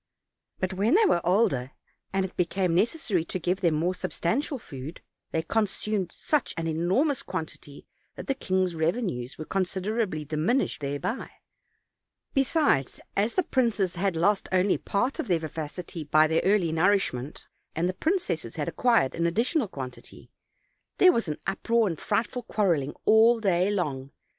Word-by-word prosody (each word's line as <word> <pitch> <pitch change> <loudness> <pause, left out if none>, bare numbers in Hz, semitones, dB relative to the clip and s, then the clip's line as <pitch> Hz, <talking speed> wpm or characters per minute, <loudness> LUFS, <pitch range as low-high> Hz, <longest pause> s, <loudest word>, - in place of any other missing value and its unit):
But 185 0 -1
when 205 - +2
they 440 +2 +5
were 175 - +3
older, 165 - +1 0.4
and 195 0 +1
it 185 - -9
be 180 - +3
came 185 -1 0
necessary 210 - +1
to 185 - -3
give 180 +2 -1
them 170 -4 +2
more 170 +4 +1
substantial 250 - -1
food, 145 - -9 0.3
they 160 - -1
consumed 210 -2 -1
such 300 -4 -1
an 165 - -2
enormous 185 - +1
quantity 160 -4 -7 0.3
that - - -7
the 275 - 0
king's 185 -8 0
revenues 160 - -2
were 155 - -6
considerably 190 -2 -1
diminished 160 - 0
thereby; 145 - -3 1.0
besides, 270 - +1 0.2
as 210 +4 +1
the 370 - +3
princes 225 - +1
had 190 0 0
only 190 +1 +2
lost - - -35
part 245 +7 0
of - - -2
their 175 -4 +3
vivacity 160 +1 -6
by 155 +1 +4
their 160 +1 +2
early 190 -4 +3
nourishment, 160 -6 0 0.3
and 170 +2 +1
the 185 - -1
princesses 185 - -1
had 150 -2 -3
acquired 195 - +2
an 170 0 0
additional 230 - +1
quantity, 130 -8 -9 0.7
there 370 - +7
was 230 - 0
an 150 - -3
uproar 225 +4 +1
and 165 -5 -3
frightful 225 +4 -1
quarreling 170 - 0
all 225 +2 +6
day 190 -3 +2
long. 145 -10 -2
185 Hz, 155 wpm, -27 LUFS, 160-220 Hz, 1.0 s, there